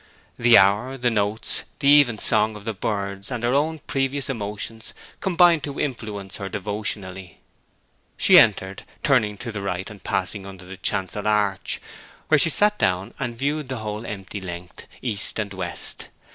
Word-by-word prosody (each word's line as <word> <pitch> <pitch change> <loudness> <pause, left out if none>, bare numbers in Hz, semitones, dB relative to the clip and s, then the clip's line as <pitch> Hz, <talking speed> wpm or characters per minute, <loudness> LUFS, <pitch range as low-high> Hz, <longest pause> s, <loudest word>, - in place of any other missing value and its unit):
The 120 0 +7
hour, 105 +7 +3
the 120 -1 +1
notes, 105 0 -1
the 140 - -1
even 140 -6 +6
song 110 0 +3
of 105 0 -11
the 115 - -2
birds, 100 -1 -3
and 120 -3 -4
her 120 +1 +1
own 155 +3 +1
previous 135 -1 -1
emotions, 110 0 -6 0.2
combined 175 -3 +4
to 145 -1 -6
influence 105 -7 -4
her 95 -1 -5
devotionally. 100 -3 -4 0.8
She - - +8
entered, 95 -3 +2 0.2
turning 110 -8 +2
to 115 +3 -6
the 105 -2 -5
right 95 -1 -3
and 100 -3 -13
passing 100 -1 -2
under 95 -2 -11
the 95 +1 -10
chancel 100 +3 -1
arch, 105 -3 0 0.5
where 155 - +5
she 165 - +6
sat 210 +6 +4
down 95 +1 0
and 120 -3 -4
viewed 145 +1 -2
the 130 - -3
whole 105 0 -5
empty 100 -2 -7
length, 90 -1 -8 0.2
east 110 -5 -2
and 105 -3 -3
west. 95 - -3
105 Hz, 165 wpm, -23 LUFS, 100-130 Hz, 0.8 s, She